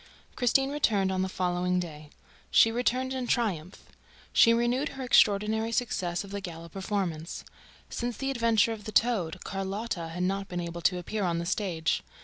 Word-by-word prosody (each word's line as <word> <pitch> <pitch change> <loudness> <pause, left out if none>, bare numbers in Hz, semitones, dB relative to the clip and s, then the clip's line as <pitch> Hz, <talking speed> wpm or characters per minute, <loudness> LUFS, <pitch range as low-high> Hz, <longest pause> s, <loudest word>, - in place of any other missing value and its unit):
Christine 270 +2 +2
returned 210 -10 +2
on 185 0 0
the 190 - -1
following 180 0 0
day. 155 -4 -7 0.4
She 225 - +6
returned 250 +2 0
in 255 -2 -3
triumph. 190 -8 -1 0.5
She 230 - +7
renewed 240 +5 +1
her 265 - -4
extraordinary 220 -1 +3
success 185 -8 -1
of 200 - -11
the 200 0 -4
gala 170 -2 -8
performance. 190 -4 -3 0.4
Since 240 -2 -4
the 270 0 -1
adventure 230 -4 +3
of 215 -1 -10
the 215 - -5
"toad," 190 -8 +1
Carlotta 195 -2 -3
had 175 +2 -4
not 195 +1 -1
been 180 - -4
able 170 0 -5
to 180 +1 +2
appear 205 +4 -3
on 170 -2 0
the 170 - -2
stage. 170 -4 0
195 Hz, 170 wpm, -28 LUFS, 175-230 Hz, 0.5 s, She